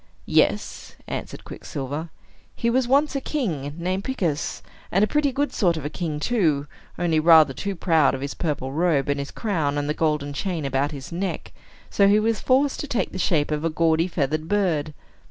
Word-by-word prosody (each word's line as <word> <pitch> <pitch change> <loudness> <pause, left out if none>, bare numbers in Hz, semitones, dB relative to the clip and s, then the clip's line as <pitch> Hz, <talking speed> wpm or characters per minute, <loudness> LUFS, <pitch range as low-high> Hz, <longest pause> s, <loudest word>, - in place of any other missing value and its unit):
"Yes," - - 0
answered - - -6
Quicksilver. 145 +4 -6 0.5
"He 235 - 0
was 255 0 +2
once 285 +3 +3
a 275 - -1
king, 160 - -3
named 185 +3 -2
Picus, 175 - -2 0.3
and 195 +3 +3
a - - +4
pretty 295 +1 +1
good 285 +3 -1
sort 175 -6 +2
of 150 - -6
a 145 - -3
king, 160 -4 -3
too, 155 -9 +1 0.3
only 165 -3 +1
rather 155 -3 +6
too 200 +9 -4
proud 160 -6 +3
of 130 - -7
his 140 +1 -3
purple 145 -5 -3
robe, 150 -2 +1
and 145 0 0
his 140 - -4
crown, 160 -10 -1
and 145 0 -1
the 150 - 0
golden 150 -3 -1
chain 170 -1 -3
about 135 +1 0
his 140 -1 -8
neck; 185 +3 -3 0.4
so 200 - +4
he 205 +1 +5
was 225 0 +1
forced 270 +2 +2
to 295 - -4
take 245 -5 -1
the 185 - -6
shape 155 -4 +1
of 150 0 -1
a 165 - +1
gaudy 165 +1 +2
feathered 155 -2 -1
bird. 165 -7 0
165 Hz, 195 wpm, -24 LUFS, 145-200 Hz, 0.5 s, rather